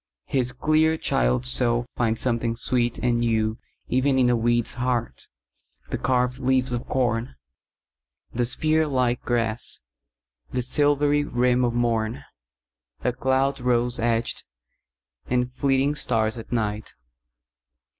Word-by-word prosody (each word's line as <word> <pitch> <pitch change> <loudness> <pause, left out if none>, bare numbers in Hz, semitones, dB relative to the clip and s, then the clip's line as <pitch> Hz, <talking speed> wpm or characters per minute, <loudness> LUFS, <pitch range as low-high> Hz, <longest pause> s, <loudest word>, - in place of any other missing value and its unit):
His 125 -2 0
clear 155 +4 +2
child's 60 - +1
soul 120 - +2
finds 115 -2 0
something 115 -2 0
sweet 120 0 0
and 120 -1 0
newEven 120 +4 -1
in 125 -1 +4
a - - +3
weed's 120 0 +1
heart, 120 -1 -2 0.6
the - - -1
carved 125 0 0
leaves 130 -1 +1
of 120 - -4
corn, 120 - -1 1.0
The 120 +1 0
spear 155 +5 +1
like 125 -3 0
grass, 115 - -1 0.7
the 125 - -2
silvery 145 +2 +2
rim 125 -2 +1
of 120 -1 0
morn,A 65 - -4
cloud 130 +2 0
rose 125 -1 +1
edged, 115 0 0 0.8
and 125 0 0
fleeting 135 +2 +1
stars 110 -6 0
at 115 - -11
night! 110 -2 -2
120 Hz, 115 wpm, -24 LUFS, 115-130 Hz, 1.0 s, in